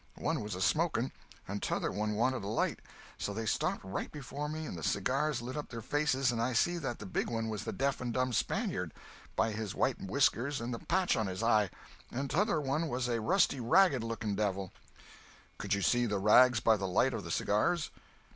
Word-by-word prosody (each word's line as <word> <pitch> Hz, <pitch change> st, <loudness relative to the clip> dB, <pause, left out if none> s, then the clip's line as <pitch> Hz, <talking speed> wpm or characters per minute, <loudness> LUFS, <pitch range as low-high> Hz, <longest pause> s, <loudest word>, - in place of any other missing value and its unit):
One 160 Hz, -5 st, -1 dB
was 105 Hz, -2 st, -4 dB
a 90 Hz, -, -5 dB
smoking, 155 Hz, -6 st, +1 dB, 0.4 s
and 100 Hz, +1 st, -4 dB
t'other -, -, -1 dB
one 105 Hz, 0 st, -1 dB
wanted 120 Hz, +1 st, +1 dB
a -, -, -4 dB
light; 110 Hz, -, 0 dB, 0.4 s
so 100 Hz, -, -3 dB
they 115 Hz, +1 st, -3 dB
stopped -, -, 0 dB
right 95 Hz, -, -4 dB
before 145 Hz, 0 st, -5 dB
me 155 Hz, +1 st, -4 dB
and -, -, -5 dB
the 80 Hz, -, -7 dB
cigars 140 Hz, -, 0 dB
lit 125 Hz, +2 st, -5 dB
up 150 Hz, -, -5 dB
their 115 Hz, -2 st, -7 dB
faces 135 Hz, -2 st, +1 dB
and 115 Hz, -1 st, -1 dB
I 125 Hz, +2 st, 0 dB
see 175 Hz, +9 st, +2 dB
that 135 Hz, -7 st, -3 dB
the 105 Hz, -, -8 dB
big 95 Hz, -, -2 dB
one 115 Hz, -1 st, -2 dB
was 110 Hz, 0 st, -4 dB
the -, -, -2 dB
deaf 140 Hz, 0 st, -1 dB
and 125 Hz, -1 st, -2 dB
dumb 130 Hz, 0 st, 0 dB
Spaniard, -, -, -1 dB, 0.4 s
by 115 Hz, -, +2 dB
his 110 Hz, -1 st, -4 dB
white -, -, 0 dB
whiskers 130 Hz, +5 st, +1 dB
and 120 Hz, +2 st, -3 dB
the 115 Hz, -, -4 dB
patch 185 Hz, -1 st, +1 dB
on 110 Hz, -, 0 dB
his 95 Hz, +4 st, -4 dB
eye, 110 Hz, -4 st, +4 dB, 0.4 s
and 135 Hz, +2 st, -3 dB
t'other 205 Hz, -1 st, +2 dB
one 150 Hz, +3 st, -1 dB
was 125 Hz, -3 st, -1 dB
a 120 Hz, -2 st, 0 dB
rusty, 165 Hz, -, +3 dB
ragged 135 Hz, +1 st, +4 dB
looking 115 Hz, -2 st, -3 dB
devil." 100 Hz, -2 st, -1 dB, 0.9 s
"Could -, -, 0 dB
you 100 Hz, -, -2 dB
see 120 Hz, 0 st, +3 dB
the 105 Hz, -2 st, 0 dB
rags 110 Hz, +4 st, +6 dB
by 110 Hz, 0 st, +4 dB
the 95 Hz, -1 st, -2 dB
light 125 Hz, +8 st, +2 dB
of 110 Hz, -3 st, -4 dB
the 85 Hz, -, -7 dB
cigars?" 110 Hz, -, +1 dB
120 Hz, 215 wpm, -32 LUFS, 105-140 Hz, 0.9 s, rags